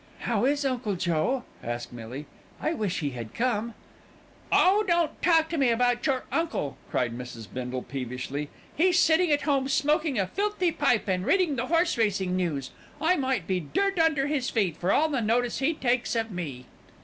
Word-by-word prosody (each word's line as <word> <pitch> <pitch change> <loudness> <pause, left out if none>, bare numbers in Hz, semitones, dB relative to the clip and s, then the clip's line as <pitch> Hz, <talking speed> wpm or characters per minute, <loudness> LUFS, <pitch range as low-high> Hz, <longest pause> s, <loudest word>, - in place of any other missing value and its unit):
"How 230 -1 0
is 285 +1 +1
Uncle 245 -6 -1
Joe?" 175 +9 0 0.2
asked 120 +1 -5
Millie. 120 +5 -7 0.3
"I 315 - 0
wish 205 - -2
he 145 -2 -1
had 115 -3 -8
come." 235 -2 -1 0.8
"Oh! 400 +4 +5
don't 340 -3 +1
talk 325 -2 +4
to 330 - -2
me 265 -3 +4
about 245 +1 +2
your 265 -2 0
uncle," 325 - -1
cried 120 -2 -1
Mrs. 120 -2 -8
Bindle 125 0 -4
peevishly. 130 +2 -5 0.3
"He's 360 +3 +3
sitting 325 0 +4
at 290 - +3
home 275 -3 +1
smoking 295 0 +1
a 195 - +2
filthy 395 - 0
pipe 280 -9 +1
and 185 -1 0
reading 360 - +2
the 250 +1 -2
horse 335 -4 +2
racing 195 -4 +1
news. 160 -8 -2 0.3
I 325 +5 +3
might 260 - -1
be 185 0 0
dirt 390 - -1
under 315 -4 +3
his 285 -3 -1
feet 195 -8 0
for 180 +3 0
all 315 - +4
the 280 -5 -1
notice 235 +2 +1
he 295 +4 +1
takes 245 -3 0
of 225 -1 -1
me." 145 -9 -5
240 Hz, 185 wpm, -27 LUFS, -, 0.8 s, Oh